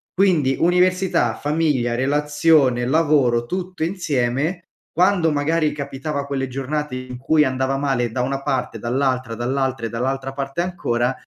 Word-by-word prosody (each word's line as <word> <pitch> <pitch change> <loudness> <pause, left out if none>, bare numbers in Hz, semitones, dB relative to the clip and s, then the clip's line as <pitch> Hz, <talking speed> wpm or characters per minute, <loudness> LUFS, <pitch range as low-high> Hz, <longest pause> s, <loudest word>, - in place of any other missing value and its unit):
Quindi, 165 -9 +3
università, 180 -8 +2
famiglia, 145 -6 0
relazione, 145 -1 +2
lavoro 135 -5 +2
tutto 185 -1 -4
insieme, 155 -1 -1 0.3
quando, 180 -1 +3
magari, 150 +1 +1
capitava 140 0 -4
quelle 135 -1 -2
giornate 135 +2 -3
in 130 -1 -7
cui 150 +4 +3
andava 130 +1 0
male 135 -4 0
da 125 - -2
una 135 +2 -2
parte, 130 -5 -2
dall'altra, 125 0 -1
dall'altra 130 0 -1
e - - -8
dall'altra 135 +3 -2
parte 135 +4 -3
ancora, 125 -9 -1
140 Hz, 135 wpm, -21 LUFS, 130-160 Hz, 0.3 s, Quindi